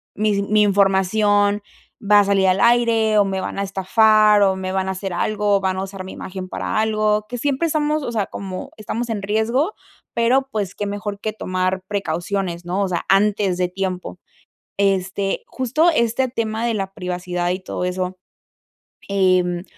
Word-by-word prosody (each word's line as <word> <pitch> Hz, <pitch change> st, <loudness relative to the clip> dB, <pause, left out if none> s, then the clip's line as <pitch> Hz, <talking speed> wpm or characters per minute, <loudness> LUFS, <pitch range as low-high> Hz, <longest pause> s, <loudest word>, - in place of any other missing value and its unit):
mis 205 Hz, -1 st, +1 dB
mi 215 Hz, 0 st, +3 dB
información 205 Hz, +1 st, +3 dB, 0.4 s
va 205 Hz, 0 st, +5 dB
a -, -, +5 dB
salir 195 Hz, -1 st, +2 dB
al 185 Hz, +1 st, +2 dB
aire 230 Hz, -2 st, +3 dB
o 205 Hz, -, +5 dB
me 190 Hz, -1 st, -2 dB
van 185 Hz, -, -5 dB
a 200 Hz, -, 0 dB
estafar 210 Hz, +2 st, +4 dB
o 190 Hz, -1 st, +3 dB
me 190 Hz, 0 st, -4 dB
van 190 Hz, 0 st, -1 dB
a -, -, 0 dB
hacer 190 Hz, 0 st, -5 dB
algo 205 Hz, +3 st, +1 dB
o -, -, -2 dB
van 190 Hz, -1 st, -1 dB
a 190 Hz, -, -2 dB
usar 195 Hz, -1 st, -7 dB
mi 190 Hz, -, -8 dB
imagen 185 Hz, 0 st, -7 dB
para -, -, -3 dB
algo, 215 Hz, -1 st, +1 dB
que 245 Hz, +2 st, -6 dB
siempre 285 Hz, +4 st, 0 dB
estamos, 305 Hz, -1 st, 0 dB
o 240 Hz, -, -3 dB
sea, 210 Hz, -4 st, -1 dB
como 190 Hz, -2 st, -6 dB
estamos 230 Hz, +3 st, -4 dB
en 210 Hz, -3 st, -3 dB
riesgo, 230 Hz, -, 0 dB, 0.4 s
pero 250 Hz, +4 st, +2 dB
pues 205 Hz, -4 st, -3 dB
qué 205 Hz, -, -3 dB
mejor 205 Hz, 0 st, -4 dB
que 215 Hz, +1 st, -3 dB
tomar 185 Hz, -2 st, -2 dB
precauciones, 185 Hz, -2 st, -2 dB
¿no? 180 Hz, +3 st, -2 dB
O 195 Hz, -, 0 dB
sea, 175 Hz, -2 st, -3 dB
antes 195 Hz, -1 st, +2 dB
de 180 Hz, -1 st, 0 dB
tiempo 180 Hz, -, -4 dB, 0.6 s
este 195 Hz, 0 st, 0 dB
justo 270 Hz, +7 st, +1 dB
este 235 Hz, +1 st, +1 dB
tema 225 Hz, -2 st, -2 dB
de 235 Hz, -, +1 dB
la 195 Hz, -2 st, -3 dB
privacidad 180 Hz, -1 st, -3 dB
y 185 Hz, +1 st, -2 dB
todo 185 Hz, -1 st, -4 dB
eso. 180 Hz, 0 st, -2 dB, 0.9 s
Em, 185 Hz, -3 st, +2 dB
200 Hz, 180 wpm, -21 LUFS, 190-220 Hz, 0.9 s, va